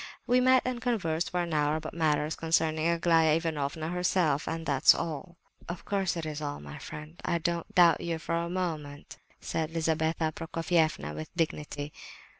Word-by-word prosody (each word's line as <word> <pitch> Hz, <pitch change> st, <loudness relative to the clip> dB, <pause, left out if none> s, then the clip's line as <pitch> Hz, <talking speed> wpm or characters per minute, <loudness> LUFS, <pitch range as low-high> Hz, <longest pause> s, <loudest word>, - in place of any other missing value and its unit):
We 250 Hz, 0 st, +4 dB
met 255 Hz, 0 st, +5 dB
and 250 Hz, -1 st, -2 dB
conversed 175 Hz, -10 st, 0 dB
for 180 Hz, 0 st, 0 dB
an 170 Hz, -2 st, -4 dB
hour 150 Hz, 0 st, +2 dB
about 155 Hz, 0 st, -5 dB
matters 155 Hz, -1 st, +1 dB
concerning 160 Hz, -1 st, +1 dB
Aglaya 165 Hz, -2 st, +4 dB
Ivanovna 160 Hz, -1 st, -2 dB
herself, 175 Hz, -4 st, +1 dB
and 165 Hz, 0 st, -3 dB
that's 140 Hz, -3 st, +5 dB
all." 170 Hz, +2 st, -5 dB, 0.3 s
"Of 175 Hz, 0 st, -6 dB
course 195 Hz, -3 st, 0 dB
it 165 Hz, -, -3 dB
is 155 Hz, -1 st, -4 dB
all, 145 Hz, -1 st, -4 dB
my 70 Hz, 0 st, -9 dB
friend. 150 Hz, +2 st, -9 dB
I 170 Hz, -, +1 dB
don't 170 Hz, 0 st, -2 dB
doubt 175 Hz, -2 st, +6 dB
you 170 Hz, -1 st, -2 dB
for 160 Hz, -, -4 dB
a 170 Hz, 0 st, 0 dB
moment," 155 Hz, -6 st, -4 dB, 0.2 s
said 160 Hz, -1 st, -2 dB
Lizabetha 160 Hz, 0 st, 0 dB
Prokofievna 165 Hz, -, 0 dB
with 80 Hz, +1 st, -6 dB
dignity. 150 Hz, -3 st, -2 dB
165 Hz, 170 wpm, -29 LUFS, 155-170 Hz, 0.3 s, doubt